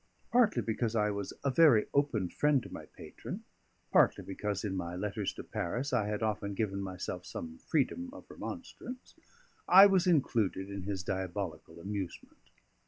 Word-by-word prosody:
Partly 240 -3 +4
because 115 0 -1
I 105 -1 +2
was 100 -1 -4
a 140 - +2
very 130 -7 +6
open 140 -10 +2
friend 145 +1 +2
to - - -10
my - - -8
patron, - - -8 0.5
partly - - +4
because 100 0 -3
in 100 -3 -2
my 85 -1 -3
letters 105 +1 -2
to - - -8
Paris 125 +11 -3
I 110 -4 +2
had 105 +1 -2
often 105 -2 -1
given 100 -2 -1
myself 95 -2 -5
some 80 0 -7
freedom 165 - 0
of 285 - -11
remonstrance, 250 +1 -8 0.5
I 190 +2 +10
was 190 -2 +4
included 110 - +1
in 100 -1 -5
his 95 -2 -3
diabolical 90 -4 -4
amusement. 95 0 -6
105 Hz, 160 wpm, -32 LUFS, 95-140 Hz, 0.5 s, I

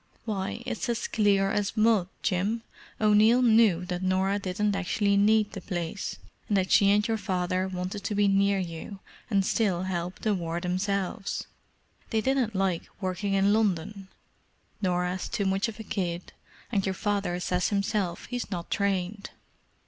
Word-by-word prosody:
Why, 210 +1 -3
it's 245 0 -3
as 235 -1 -1
clear 200 -2 +2
as 205 +2 -1
mud, 215 -4 +4 0.2
Jim! 205 +6 0 0.4
O'Neill 215 +3 +5
knew 220 -7 +4
that 180 -1 -3
Norah 190 +2 +1
didn't 200 +2 -1
actually 200 +1 +1
need 210 +1 +4
the 195 - -7
place, 175 0 -4 0.3
and 205 - +2
that 185 -1 0
she 200 -2 +6
and 210 +1 +3
your 225 -1 0
father 185 -2 -1
wanted 185 +2 -4
to 205 - -1
be 205 0 +3
near 200 0 +3
you 180 +2 -5 0.3
and 200 -3 +2
still 190 -5 +1
help 180 -1 -3
the 215 - +1
war 170 -2 -2
themselves. 195 +2 -2 0.6
They 225 - +1
didn't 250 -2 0
like 190 -3 0
working 195 +1 -1
in 195 +1 +4
London—Norah's 185 -2 -3
too 200 - -1
much 195 +4 +1
of 225 -1 -8
a - - -5
kid, 180 -4 -3 0.4
and 200 -4 +1
your 190 0 -1
father 200 -3 -1
says 180 0 0
himself 200 -3 -1
he's 245 -2 -4
not 175 -4 -5
trained. 200 0 -1
195 Hz, 155 wpm, -27 LUFS, 185-210 Hz, 0.6 s, she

